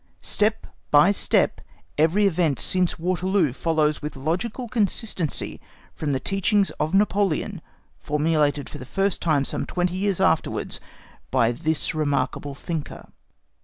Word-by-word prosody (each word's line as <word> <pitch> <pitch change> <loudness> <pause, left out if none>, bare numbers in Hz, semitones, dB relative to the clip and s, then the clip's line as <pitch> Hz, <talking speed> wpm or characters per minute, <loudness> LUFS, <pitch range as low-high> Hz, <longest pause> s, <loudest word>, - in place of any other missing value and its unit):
Step 215 +1 0 0.2
by 150 +7 +6
step, 205 - +1 0.3
every 165 +7 +3
event 165 -7 +1
since 185 -2 +1
Waterloo 180 -3 +1
follows 155 0 +1
with 150 0 -5
logical 185 - -2
consistency 205 - -2 0.3
from 150 -2 -3
the 135 - 0
teachings 195 - +1
of 155 +5 0
Napoleon, 200 -2 +1 0.4
formulated 150 -1 +1
for - - -9
the - - -7
first 195 +3 0
time, 150 -4 +2
some - - -3
twenty 180 0 -1
years 195 -1 0
afterwards, 175 -4 0 0.5
by 115 0 +3
this 155 +5 -1
remarkable 145 -2 -1
thinker. 160 +1 -6
165 Hz, 130 wpm, -24 LUFS, 150-195 Hz, 0.5 s, by